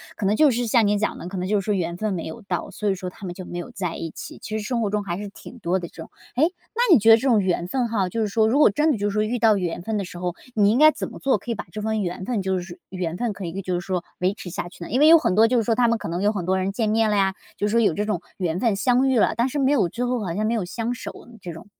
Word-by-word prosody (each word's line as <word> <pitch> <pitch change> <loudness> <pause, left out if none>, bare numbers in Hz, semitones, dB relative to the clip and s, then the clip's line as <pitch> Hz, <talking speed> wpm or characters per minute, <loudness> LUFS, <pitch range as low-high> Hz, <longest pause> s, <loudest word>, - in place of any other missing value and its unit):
可 205 - -3
能 205 +2 +3
就 300 +3 +5
是 245 0 0
像 225 -1 +3
你 205 0 +2
讲 215 - -2
的， 175 - -7
可 190 0 -6
能 180 +1 -2
就 205 -1 +1
是 - - -12
说 210 -2 +1
缘 170 -2 -2
分 215 -2 -1
没 165 - -4
有 160 +9 -7
到， - - -3
所 210 -1 -2
以 190 - +1
说 180 -1 -6
他 190 - -9
们 175 - -6
就 185 - -8
没 175 - -6
有 - - -7
在 180 -3 -4
一 165 - -5
起， - - -9
其 215 0 -4
实 210 - -4
生 240 -2 -1
活 210 - 0
中 210 0 -1
还 175 -2 -3
是 205 -1 -6
挺 245 +4 -13
多 180 0 0
的 175 -2 -5
这 - - -20
种。 - - -10 0.3
诶， 285 +6 +4 0.3
那 475 - 0
你 325 - +9
觉 225 +2 +6
得 225 - +9
这 270 - -2
种 225 -3 +5
缘 180 -2 -1
分 250 +2 0
哈， 195 -5 0
就 225 +2 -2
是 215 - +1
说 220 +2 +2
如 245 +6 +2
果 295 - +6
真 300 +7 +2
的 265 - 0
就 205 0 -1
是 - - -7
说 215 - +1
遇 230 +3 -1
到 225 -2 +4
缘 175 -1 -3
分 220 +1 -2
的 200 - -1
时 175 -1 -9
候， 180 -1 -2 0.2
你 205 -1 +4
应 245 - +2
该 310 0 +9
怎 - - -5
么 - - -10
做， 270 - +2
可 240 - -6
以 - - -1
把 - - -7
这 215 - -5
份 220 -1 0
缘 180 0 -4
分 230 -3 -1
就 190 -1 0
是 175 0 -9
缘 180 -2 -3
分 235 -4 -1
可 190 -2 -7
以 185 +4 -4
就 180 -1 -2
是 - - -6
说 180 -2 -2
维 185 +2 +1
持 185 - -9
下 170 - -4
去 175 - -11
呢？ - - -8
因 255 - +1
为 305 - +6
有 330 0 +9
很 240 - 0
多 220 +2 +6
就 245 +1 +2
是 230 - +2
说 225 +1 +1
他 240 0 +3
们 230 -1 +1
可 - - -5
能 175 +4 -2
有 210 - +3
很 195 -5 -3
多 190 +2 +1
人 190 +1 -1
见 220 0 -1
面 220 0 +2
了 205 - +2
呀， 195 -1 +2 0.2
就 205 - -1
说 230 +2 +2
有 205 -8 +3
这 210 +4 -2
种 180 -5 -2
缘 175 -2 -1
分 225 -3 +2
相 250 +6 +2
遇 260 -3 +3
了， - - +2
但 235 - +2
是 285 +2 -3
没 270 +1 +3
有 185 -12 +2
之 245 +6 -3
后 250 0 0
好 170 - -3
像 215 +3 -1
没 230 - +1
有 200 -5 -1
相 230 +6 -3
守 - - -7 0.3
这 175 -3 -7
种。 165 +5 -12
205 Hz, 385 characters per minute, -23 LUFS, 185-230 Hz, 0.3 s, 你